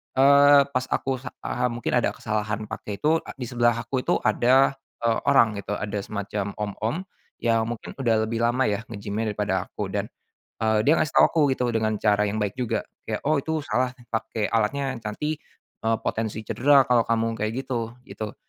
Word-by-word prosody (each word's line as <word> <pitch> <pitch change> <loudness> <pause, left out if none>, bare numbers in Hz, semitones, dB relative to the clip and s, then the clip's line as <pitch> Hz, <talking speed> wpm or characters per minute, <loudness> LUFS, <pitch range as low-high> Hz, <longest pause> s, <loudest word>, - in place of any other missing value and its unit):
eee, 140 +1 +7
pas 130 -2 0
aku 135 -1 -1
sa 125 0 -9
eee, 125 0 0
mungkin 120 -1 0
ada - - +1
kesalahan 110 0 -2
pakai 100 -1 -6
itu 160 +2 +3 0.2
di 130 - -5
sebelah 120 -1 +3
aku 125 +3 -2
itu - - +2
ada, 130 +5 +3 0.3
eee, 115 -1 +2
orang 115 -7 +4
gitu 100 - -4
ada 105 0 -3
semacam 100 0 -4
om-om, 105 +4 -2 0.5
yang 115 -1 +2
mungkin 120 -2 -6
udah 115 -3 +3
lebih 115 +1 -3
lama 120 +3 +2
ya 100 -1 0
nge-gym-nya 110 0 -3
daripada 100 -2 -1
aku 100 -2 -5
dan, 100 0 -2 0.5
eee, 110 -1 +2
dia 145 - +4
ngasih 155 - -1
tahu - - +7
aku 165 - +1
gitu 125 -2 -1
dengan 110 -1 0
cara 105 -1 +3
yang 105 +1 -1
baik 105 +4 -3
juga 125 -3 -1 0.2
kayak - - -3
oh 155 +1 +2
itu 160 +2 -2
salah 125 0 0 0.2
pakai 110 -1 -2
alatnya 130 +4 0
yang - - -15
nanti, 150 +9 -3 0.5
eee, 115 0 +3
potensi 110 -1 -2
cedera 135 +5 +4
kalau 120 -2 +4
kamu 115 0 0
kayak 105 +1 -1
gitu 120 -3 -3
gitu 110 -4 -7
115 Hz, 190 wpm, -25 LUFS, 105-130 Hz, 0.5 s, eee